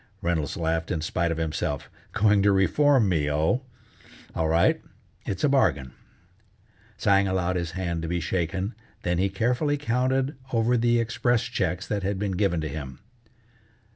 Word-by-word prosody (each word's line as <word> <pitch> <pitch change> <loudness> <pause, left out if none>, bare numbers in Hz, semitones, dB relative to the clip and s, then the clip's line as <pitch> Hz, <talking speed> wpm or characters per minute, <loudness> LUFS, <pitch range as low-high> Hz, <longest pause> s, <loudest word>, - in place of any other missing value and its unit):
Reynolds 85 -1 -1
laughed 80 -1 -1
in 80 -4 -1
spite 85 +1 -1
of 80 - -2
himself: 75 -3 -2 0.2
"Going 105 -1 +3
to 100 +1 +4
reform 125 +5 +3
me, 80 -5 +1
oh? 80 - +1 0.7
All 80 -1 0
right, 85 +1 +3 0.5
it's 95 -2 -3
a - - +5
bargain." 70 - +1 1.0
Tsang 100 0 +3
allowed 90 -1 0
his 85 -1 -3
hand 85 -3 -2
to 80 - -4
be 85 +1 -1
shaken, 90 +4 -2 0.3
then 90 0 0
he 100 +1 +2
carefully 125 +9 0
counted 130 +2 0 0.2
over 115 +1 +2
the 120 0 +3
express 115 +1 +1
checks 90 +3 -2
that 105 -1 -2
had 100 +1 -1
been 100 0 -2
given 90 -3 0
to 80 - -2
him. 70 -3 -6
95 Hz, 160 wpm, -26 LUFS, 80-115 Hz, 1.0 s, a